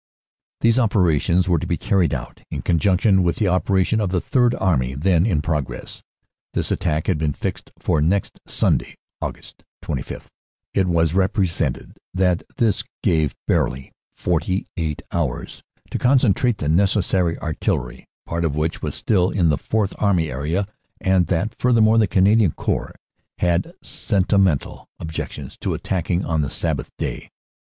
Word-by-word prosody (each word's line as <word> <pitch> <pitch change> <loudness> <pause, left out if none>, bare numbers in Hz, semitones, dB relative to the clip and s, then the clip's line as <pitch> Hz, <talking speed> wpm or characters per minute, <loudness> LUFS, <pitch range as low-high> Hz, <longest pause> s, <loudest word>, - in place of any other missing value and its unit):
These 115 +2 +4
operations 90 - +2
were 85 -3 +3
to - - -4
be - - 0
carried 95 -4 +1
out 65 -3 -5
in - - -5
conjunction 95 +3 +3
with 85 -1 +1
the 105 - 0
operation 95 +4 +2
of 100 - 0
the 90 0 +1
Third 125 - +2
Army 65 -8 0
then 85 +5 +2
in 80 -8 +1
progress. 75 -4 -3 0.5
This - - -1
attack 80 -4 0
had 90 -6 0
been 75 -2 0
fixed - - -5
for 75 - 0
next 95 +5 0
Sunday, - - 0 0.3
Aug. - - -6 0.3
25. - - -5 0.5
It 95 -2 +2
was 85 -2 +2
repre 95 +1 +2
sented 80 -6 -3 0.2
that 90 -2 +2 0.2
this 110 -4 +1 0.2
gave 80 -4 +2
barely 65 0 0 0.2
48 85 -5 -2
hours 75 -8 -3 0.3
to - - -2
concentrate 125 -3 +3
the 75 - -4
neces 95 +5 +3
sary 90 -4 +1
artillery, 80 -2 -3 0.2
part 85 0 -2
of 75 -3 0
which 80 +2 -1
was - - -3
still 95 -4 +2
in 90 -5 +2
the 75 - +2
Fourth 105 -3 -1
Army 90 -7 +2
area, 80 +9 -1 0.3
and 95 -2 +2
that, 95 +6 0
furthermore, 115 -2 +4
the 110 - +4
Canadian 100 0 +4
Corps - - -2 0.4
had 85 -1 0
sentimental 95 -5 0
objections 80 -1 -6
to - - -1
attacking 90 0 -1
on 80 -2 0
the 70 - -1
Sabbath - - -2
Day. - - -4
90 Hz, 150 wpm, -21 LUFS, 80-100 Hz, 0.5 s, These